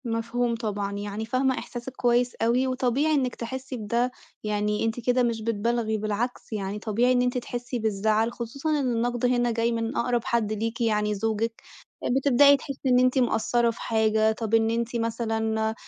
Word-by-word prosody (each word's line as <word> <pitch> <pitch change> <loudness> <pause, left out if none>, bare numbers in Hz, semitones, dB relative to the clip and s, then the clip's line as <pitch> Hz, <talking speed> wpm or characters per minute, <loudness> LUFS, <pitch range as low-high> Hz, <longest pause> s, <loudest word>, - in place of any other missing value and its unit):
مفهوم 230 +1 -1
طبعًا، 205 -3 -3
يعني 205 +2 -4
فاهمة 255 +2 +1
إحساسِك 245 +1 -7
كويِّس 245 0 +2
أوي، 240 +3 +1
وطبيعي 260 +4 +1
إنِّك 260 -4 0
تحِسِّي 260 +2 -5
بده، 235 +3 0 0.3
يعني 210 0 0
أنتِ 225 +2 -1
كده 245 +1 +2
مش 230 -2 -1
بتبالغي، 225 0 0
بالعكس 215 +3 -3
يعني 200 0 -3
طبيعي 230 +4 +1
إن 250 -1 +3
أنتِ 250 0 0
تحِسِّي 245 0 -4
بالزَّعل، 220 +1 +1
خصوصًا 260 +6 -4
إن 260 -3 0
النَّقد 240 +1 0
هنا 245 -1 +2
جاي 230 +1 +1
من 230 +2 -2
أقرب 240 -1 +1
حَدّ 235 -4 0
ليكِ 225 +3 -3
يعني 210 -2 +1
زوجِك، 225 +2 -2 0.6
بتبدأي 280 +1 +6
تحِسِّي 275 0 -4
إن 250 0 +5
أنتِ 255 +1 +3
مقصِّرة 235 0 +2
في 230 - -11
حاجة، 220 -1 +2
طب 220 0 -4
إن 225 0 +4
أنتِ 235 +1 -2
مثلًا 225 -1 -1
230 Hz, 170 wpm, -26 LUFS, 220-245 Hz, 0.6 s, بتبدأي